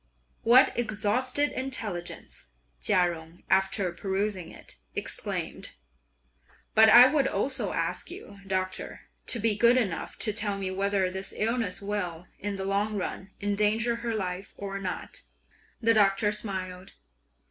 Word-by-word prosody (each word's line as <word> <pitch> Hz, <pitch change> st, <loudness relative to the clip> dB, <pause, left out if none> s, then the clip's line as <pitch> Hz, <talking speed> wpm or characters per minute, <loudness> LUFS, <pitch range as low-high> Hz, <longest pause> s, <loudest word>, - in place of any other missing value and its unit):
"What 245 Hz, +3 st, +6 dB
exalted 240 Hz, +6 st, +1 dB
intelligence!" 220 Hz, -10 st, -4 dB, 0.3 s
Chia 175 Hz, -, +3 dB
Jung, 160 Hz, +1 st, -12 dB
after 190 Hz, -1 st, +2 dB
perusing 190 Hz, 0 st, -2 dB
it, -, -, -10 dB, 0.2 s
exclaimed. -, -, -2 dB, 1.0 s
"But 220 Hz, 0 st, +7 dB
I 240 Hz, +3 st, +10 dB
would 275 Hz, 0 st, +3 dB
also 270 Hz, 0 st, 0 dB
ask -, -, -2 dB
you, 345 Hz, -, -10 dB
Doctor, 185 Hz, -1 st, -3 dB, 0.3 s
to -, -, +3 dB
be 220 Hz, 0 st, +2 dB
good 235 Hz, +4 st, +5 dB
enough 195 Hz, -10 st, -2 dB
to 215 Hz, -, +2 dB
tell 205 Hz, -2 st, 0 dB
me 190 Hz, -1 st, -3 dB
whether 195 Hz, -1 st, 0 dB
this 190 Hz, +1 st, -4 dB
illness 225 Hz, -3 st, -1 dB
will, 180 Hz, -4 st, -3 dB
in 205 Hz, 0 st, -3 dB
the 190 Hz, 0 st, -4 dB
long 200 Hz, +2 st, 0 dB
run, 190 Hz, 0 st, -4 dB
endanger 210 Hz, +3 st, +1 dB
her 235 Hz, -1 st, -3 dB
life 185 Hz, -1 st, -4 dB
or 195 Hz, 0 st, -5 dB
not?" 185 Hz, -2 st, -5 dB, 0.6 s
The 230 Hz, 0 st, +4 dB
Doctor 205 Hz, -1 st, +3 dB
smiled. 190 Hz, -3 st, -5 dB
205 Hz, 135 wpm, -28 LUFS, 190-225 Hz, 1.0 s, I